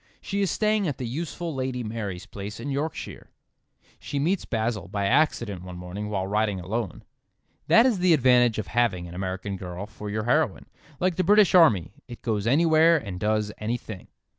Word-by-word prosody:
She 200 0 -3
is 195 - +1
staying 215 +1 +1
at 145 - -3
the 125 - -4
useful 165 +6 -4
Lady 130 -2 -3
Mary's 105 -4 -5
place 100 +1 -8
in 140 +4 -4
Yorkshire. 145 +4 -4 0.7
She 145 - -5
meets 170 +7 0
Basil 110 -5 -2
by 100 +1 -2
accident 120 - +1
one 90 -1 -9
morning 90 +4 -6
while 95 -3 -1
riding 105 0 0
alone. 95 +1 -4 0.6
That 230 - +6
is 235 -7 +2
the 180 -2 +5
advantage 125 -4 +4
of 110 - -2
having 95 -8 0
an 85 - -10
American 95 +2 -4
girl 90 +1 -6
for 105 0 -8
your 110 +1 -2
heroine. 130 -1 +1 0.3
Like 180 -2 0
the 185 - +2
British 205 +1 +5
army: 150 - +5 0.2
it 120 -1 -11
goes 110 -2 -1
anywhere 160 +4 +5
and 100 - -6
does 105 +1 0
anything. 110 -3 -5
115 Hz, 180 wpm, -25 LUFS, 100-155 Hz, 0.7 s, That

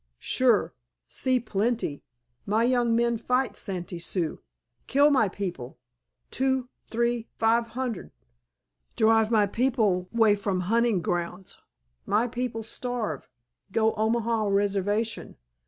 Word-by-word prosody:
"Sure. 230 - +2 0.3
See 255 -1 +1
plenty. 220 -7 -1 0.5
My 215 +3 +2
young 240 -1 +2
men 235 -1 +1
fight 250 +2 0
Santee 180 -3 -5
Sioux. 170 -1 -3 0.5
Kill 285 +2 +4
my 255 -8 +3
people, 180 -11 -6 0.5
two, 265 -1 0 0.2
t'ree, 235 0 0
five 230 +1 +2
hunnerd. 250 -6 -3 0.9
Drive 220 0 +4
my 215 -3 +4
people 210 -5 +1
way 225 -3 +4
from 200 -2 -1
hunting 225 -1 +1
grounds. 175 +2 -3 0.5
My 215 +3 +2
people 240 -2 -3
starve. 225 - -4 0.4
Go 220 +2 +2
Omaha 225 0 0
Reservation. 205 +2 0
225 Hz, 110 wpm, -26 LUFS, 200-240 Hz, 0.9 s, Kill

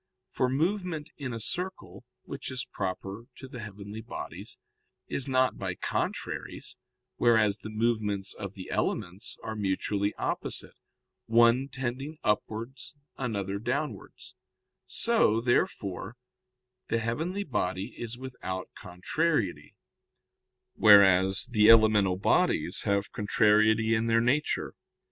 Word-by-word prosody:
For 130 - +1
movement 165 +2 -1
in 140 -3 -5
a 115 - -4
circle, 180 - -5 0.2
which - - -6
is 130 0 -2
proper 95 +3 -5
to 135 - -10
the 130 -2 -9
heavenly 105 0 -8
bodies, 110 - -7 0.5
is 135 - -2
not 130 -1 +2
by 95 -2 -3
contraries, - - -4 0.4
whereas 110 -3 +3
the 110 - -8
movements 110 -3 0
of 100 -2 -7
the 95 - -8
elements 90 +4 -2
are 110 - -4
mutually 100 0 -1
opposite, - - -3 0.5
one 120 +3 +5
tending 135 +3 -4
upwards, 115 +5 -2 0.2
another 100 -6 -3
downwards: 125 -1 -4 0.5
so, 110 +2 +2
therefore, 105 -4 -1 0.7
the - - +1
heavenly 160 - -2
body 95 - -2
is 120 0 -5
without 125 -8 -6
contrariety, 95 - -2 1.0
whereas 95 -2 +6
the 110 -3 +4
elemental 110 -4 +6
bodies 95 - +1
have 100 0 0
contrariety 110 +1 +3
in 115 0 +1
their 115 0 +4
nature. 130 +6 0
110 Hz, 110 wpm, -29 LUFS, 100-130 Hz, 1.0 s, whereas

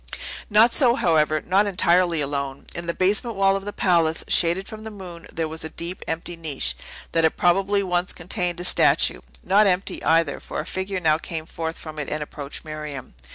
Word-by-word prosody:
Not 220 +3 +5
so, 245 -4 +4
however; 155 - +2
not 195 +3 +3
entirely 175 -3 +2
alone! 140 -1 -3
In 170 0 -5
the 170 - 0
basement 210 +5 +2
wall 195 0 +3
of 195 0 -4
the 205 - -4
palace, 165 -5 +1
shaded 175 +3 +2
from 215 0 -9
the 220 - -6
moon, 180 -5 -10
there 160 -1 -2
was 160 0 -4
a 160 - -5
deep, 170 +3 -6
empty 165 +2 -4
niche, 140 - -3 0.4
that 165 - +2
had 160 - +2
probably 195 +3 +2
once 180 -1 -1
contained 175 0 -2
a - - -4
statue; 180 - +4 0.2
not 205 +2 +4
empty, 185 0 -1
either; 165 -3 +2
for - - -6
a 150 - -4
figure 190 +1 -3
now 155 -2 +2
came 160 -1 -5
forth 165 0 -5
from 155 -1 -8
it 150 - -4
and 150 0 -2
approached 145 0 -8
Miriam. 150 - -7
170 Hz, 200 wpm, -23 LUFS, 160-195 Hz, 0.4 s, Not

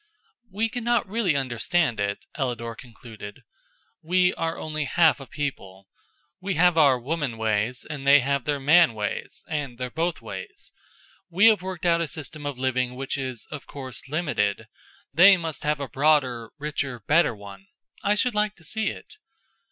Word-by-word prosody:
"We 210 +4 0
cannot 240 -1 0
really 200 -6 +1
understand 130 +1 0
it," 100 0 -2
Ellador 120 -4 -3
concluded. 110 -3 -11 0.6
"We 180 +2 +2
are 165 0 -2
only 155 -1 -3
half 160 +2 +4
a 135 - -10
people. 100 -10 -6 0.5
We 195 0 -2
have 175 +2 +4
our 140 -6 +5
woman 140 -2 -3
ways 110 +2 -1
and 140 -3 -6
they 140 0 +8
have 140 0 -1
their 145 -1 0
man 150 -2 +5
ways 105 -1 -5
and 145 -6 -4
their 125 0 -4
both 165 +4 -1
ways. 410 0 -8 0.6
We 185 +5 +4
have 215 -4 +2
worked 185 -2 -6
out 170 -1 +3
a 165 - -1
system 145 0 -6
of 140 -3 -4
living 130 -1 -1
which 135 +1 -3
is, 130 -4 -4
of 150 -3 -7
course, 130 -1 -6
limited. 150 - -1 0.5
They 185 +5 +8
must 165 -3 -5
have 150 0 0
a 140 - -4
broader, 130 -3 +2
richer, 140 -5 -3
better 150 - +3
one. 100 -1 -12 0.3
I 205 +1 +2
should 245 +3 +1
like 210 0 0
to 170 - -18
see 220 +7 -2
it." - - -6
145 Hz, 165 wpm, -25 LUFS, 125-170 Hz, 0.6 s, they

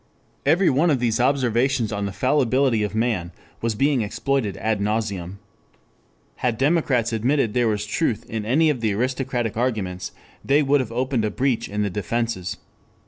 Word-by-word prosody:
Every 175 +5 +4
one 150 +6 +3
of 140 -5 +2
these 115 -2 0
observations 125 -2 +1
on 100 -1 -2
the - - -4
fallibility 130 0 +2
of 105 0 -2
man 110 -7 0 0.3
was 115 -1 -1
being 135 +2 +2
exploited 110 +1 -1
ad 110 -1 -1
nauseam. 100 -4 -2 1.0
Had 120 -3 -1
democrats 135 -5 +1
admitted 120 0 +1
there 120 -2 +2
was 105 -1 -1
truth 115 +1 -1
in 110 -1 -4
any 150 +8 +3
of 130 -5 -4
the 110 -3 +1
aristocratic 125 -1 -1
arguments 100 -7 -2 0.3
they 145 +2 +3
would 140 +1 +3
have 125 -4 -3
opened 125 0 0
a 105 - +1
breach 130 0 -1
in 105 +1 -1
the 100 - -1
defenses. 105 -1 -2
115 Hz, 165 wpm, -23 LUFS, 105-135 Hz, 1.0 s, Every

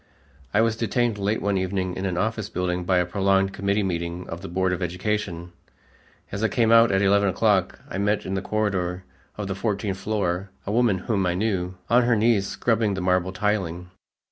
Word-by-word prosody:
I 105 - +3
was 115 -1 +2
detained 115 -1 0
late 100 +3 -1
one 100 -1 +1
evening 95 -1 -2
in 95 +1 -2
an 90 -2 -2
office 110 +1 -1
building 90 0 -2
by 95 0 +2
a 90 - +2
prolonged 95 +1 +1
committee 100 +1 0
meeting 85 -1 -3
of 85 +1 -6
the 95 - -7
Board 95 +1 0
of 90 - -3
Education. 90 -1 -3 0.8
As 100 +2 -3
I - - +4
came 115 +2 +2
out 115 -1 +7
at 95 +1 +2
eleven 100 0 +4
o'clock, 100 0 +1
I 95 - -4
met 105 +1 0
in 95 - -3
the 95 - -1
corridor 95 -4 -1 0.3
of 105 - -3
the 95 - -2
fourteenth 100 -1 -2
floor 100 -2 -1 0.2
a 100 - -3
woman 115 -3 +3
whom 100 -4 +1
I 90 - 0
knew, 95 -3 -1
on 120 +1 +5
her 120 -1 +3
knees 110 -2 +2
scrubbing 110 -4 0
the - - -3
marble 90 0 +1
tiling. 95 -4 -2
95 Hz, 200 wpm, -24 LUFS, 90-105 Hz, 0.8 s, out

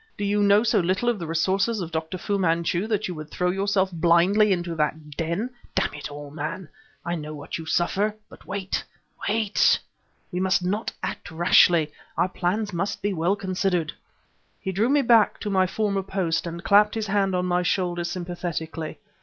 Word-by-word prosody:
"Do 205 - -2
you 205 +1 +1
know 205 +1 +5
so 215 -2 +3
little 185 +7 +1
of 235 -4 0
the 170 - -5
resources 190 +7 +1
of 170 -3 -4
Dr. 160 +2 -3
Fu 200 +2 -1
Manchu 170 +2 +1
that 215 -2 0
you 180 - -4
would 155 -2 -8
throw 180 +2 0
yourself 195 0 +1
blindly 175 +5 +4
into 175 -2 -1
that 155 -1 -2
den? 170 - -2 0.2
Damn - - +1
it 150 0 -6
all, 145 0 -9
man! 155 +3 -5 0.4
I 170 - -1
know 155 -2 -5
what 145 +2 -6
you 160 - -8
suffer! 200 +6 +1
but - - -16
wait 195 -1 -2 0.5
wait. 215 -1 +3 0.5
We 180 - -2
must 185 -1 +2
not 205 +5 -1
act - - -4
rashly; 165 -1 +4 0.3
our 185 - +2
plans 200 +3 -1
must 195 +4 -2
be 205 0 0
well 175 +3 +1
considered." 185 -4 -1 0.7
He 190 - -3
drew 210 +6 +1
me 285 0 +3
back 230 -3 +4
to 210 - -2
my 190 -1 +3
former 200 0 0
post 185 -4 -1
and 170 +1 -6
clapped 210 +1 +5
his 220 -1 -1
hand 195 -2 +1
on 180 0 0
my 180 0 +1
shoulder 175 -1 0
sympathetically. 170 -3 -4
185 Hz, 185 wpm, -25 LUFS, 170-200 Hz, 0.7 s, know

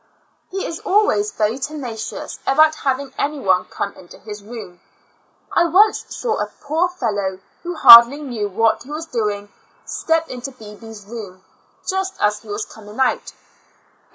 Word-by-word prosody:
He 385 0 -4
is 330 - -5
always 370 - +2
very 220 +4 -1
tenacious 265 -6 -6
about 310 +3 +5
having 275 -2 -2
any 295 +1 -1
one 190 -6 +2
come 200 - -5
into 175 - -15
his 210 -1 -9
room. 205 -5 -10 0.7
I 345 - +3
once 400 +6 +4
saw 460 -3 -2
a - - -1
poor 320 +5 0
fellow 205 - -2 0.2
who 350 0 -5
hardly 235 -1 +10
knew 240 -8 -4
what 225 +3 +1
he 260 - -13
was 310 +2 -5
doing, 210 -7 -3 0.4
step 325 0 0
into 255 +2 -7
Bebee's 220 -2 -12
room 200 -4 -9 0.4
just 380 0 -2
as 210 0 +1
he 220 - -19
was 210 +1 -4
coming 215 +1 -13
out. 260 - 0
240 Hz, 155 wpm, -20 LUFS, 210-310 Hz, 0.7 s, hardly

